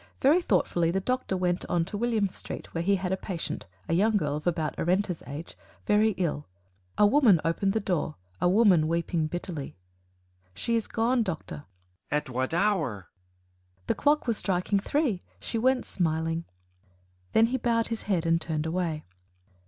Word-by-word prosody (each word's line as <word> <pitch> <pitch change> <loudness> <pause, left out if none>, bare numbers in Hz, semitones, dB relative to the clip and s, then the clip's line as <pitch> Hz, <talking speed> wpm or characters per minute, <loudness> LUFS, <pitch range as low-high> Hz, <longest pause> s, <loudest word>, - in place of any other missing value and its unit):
Very 305 +7 +5
thoughtfully 175 - +1
the 185 +3 +1
Doctor 250 -2 -1
went 180 0 0
on 170 -1 +1
to 195 - -6
William 225 -1 +1
Street 190 - -7
where 165 - -1
he 200 +3 +3
had 185 -1 -2
a - - +2
patient, 185 -4 -5 0.2
a - - 0
young 210 +5 +3
girl 150 -6 -1
of 150 +3 -5
about 160 -3 0
Arenta's 180 0 0
age 145 +4 -7 0.3
very 210 +1 +3
ill. 155 -5 -2 0.5
A 210 - +6
woman 215 - +5
opened 195 +4 +1
the 220 - +1
door 180 -6 -1 0.3
a 175 - +4
woman 185 -6 +5
weeping 165 -1 0
bitterly. 175 -3 -5 0.8
"She 230 - -1
is 225 - 0
gone, 235 +2 +1
Doctor." 160 - -4 0.4
"At 150 -1 -1
what 130 +1 -1
hour?" 165 - 0 0.7
"The - - +1
clock 300 +1 +2
was 230 -3 0
striking 190 +1 0
three 240 - 0 0.2
she 230 - -3
went 255 +2 +2
smiling." 165 -1 -1 0.9
Then 225 - +6
he - - +2
bowed 230 -2 +1
his 230 -1 -3
head 175 -4 +1
and 165 0 +2
turned 160 -1 -2
away. 165 -2 -2
185 Hz, 170 wpm, -28 LUFS, 165-220 Hz, 0.9 s, A